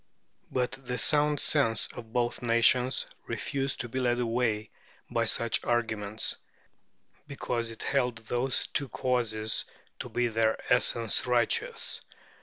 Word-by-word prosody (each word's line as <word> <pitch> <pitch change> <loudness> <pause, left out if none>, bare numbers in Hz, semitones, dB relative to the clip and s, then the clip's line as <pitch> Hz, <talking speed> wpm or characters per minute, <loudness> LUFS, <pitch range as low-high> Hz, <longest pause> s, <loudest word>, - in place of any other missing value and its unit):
But 125 -1 0
the 125 -2 -5
sound 150 0 +4
sense 115 -8 +3
of 115 -2 -10
both 120 0 -1
nations 120 +2 +3 0.2
refused 135 -1 -2
to 120 - -5
be 130 +3 -4
led 120 -1 +1
away 115 -2 -1 0.4
by - - +1
such - - +1
arguments, 110 -3 -1 0.9
because 120 -4 -3
it 115 - -8
held 125 -4 0
those 125 +4 +1
two 140 - -2
causes 115 -4 0 0.4
to - - -6
be 120 - 0
in 115 - -2
their 110 0 +2 0.2
essence 120 -1 +2
righteous. 120 -2 0
120 Hz, 130 wpm, -29 LUFS, 115-125 Hz, 0.9 s, sound